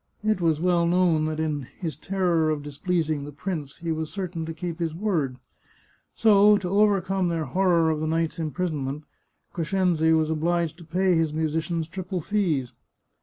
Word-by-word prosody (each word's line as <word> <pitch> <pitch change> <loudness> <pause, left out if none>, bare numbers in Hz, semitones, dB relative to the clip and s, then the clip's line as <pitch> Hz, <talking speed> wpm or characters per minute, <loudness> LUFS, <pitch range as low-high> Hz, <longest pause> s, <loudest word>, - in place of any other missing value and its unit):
It 215 -3 +1
was 160 -3 +2
well 175 -1 +2
known 170 -3 +3
that 155 0 -2
in 150 -4 -2
his 160 -7 -4
terror 175 -1 +1
of 150 -2 -1
displeasing 155 0 -1
the 145 - -7
prince 150 -2 -5
he 170 -1 -3
was 160 -1 -2
certain 180 -5 -4
to - - -3
keep 175 -1 -5
his 165 -2 -2
word; 165 -10 -1 0.8
so, 210 -1 +6
to 185 -3 -4
overcome 195 -2 +2
their 165 -2 -1
horror 170 +1 +2
of 155 - -1
the 155 - -2
night's 165 +1 -1
imprisonment, 155 -3 -3 0.5
Crescenzi 170 -2 +1
was 160 -1 +2
obliged 165 +1 0
to 170 - -12
pay 180 +3 +1
his 160 -2 +1
musicians 160 +1 -1
triple 185 +2 -4
fees. 165 - -1
165 Hz, 170 wpm, -25 LUFS, 155-180 Hz, 0.8 s, so